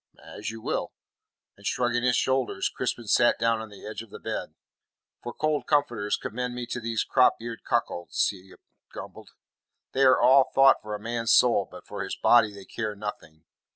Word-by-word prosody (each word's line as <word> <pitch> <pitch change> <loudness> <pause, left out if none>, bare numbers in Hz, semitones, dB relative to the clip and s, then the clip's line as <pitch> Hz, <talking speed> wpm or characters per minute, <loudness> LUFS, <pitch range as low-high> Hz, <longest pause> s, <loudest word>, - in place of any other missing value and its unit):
"As 105 - -7
you 115 0 -8
will." - - -2 0.6
And 100 - -20
shrugging 120 +3 0
his 125 0 +2
shoulders, 130 -1 0
Crispin 120 - -3
sat 120 +3 +3
down 115 0 +1
on 110 - -8
the 100 - -13
edge 110 +1 -6
of 115 - -13
the - - -9
bed. - - -5 0.7
"For 120 - -6
cold 155 +3 -1
comforters 120 -9 +1
commend 125 +2 -4
me 125 -1 -4
to - - -2
these 115 -1 -1
cropeared 120 -3 +1
cuckolds," 85 0 0
he 95 -1 -11 0.3
grumbled. - - -10 0.6
"They 135 - -1
are 130 -1 +6
all 135 +1 +5
thought 135 0 +6
for 105 0 -5
a - - -7
man's 115 +2 0
soul, 110 -6 +4
but - - -12
for - - -5
his - - -4
body 115 -3 +4
they 100 -1 -12
care 110 0 -4
nothing. 90 -6 -8
115 Hz, 185 wpm, -26 LUFS, 105-125 Hz, 0.7 s, are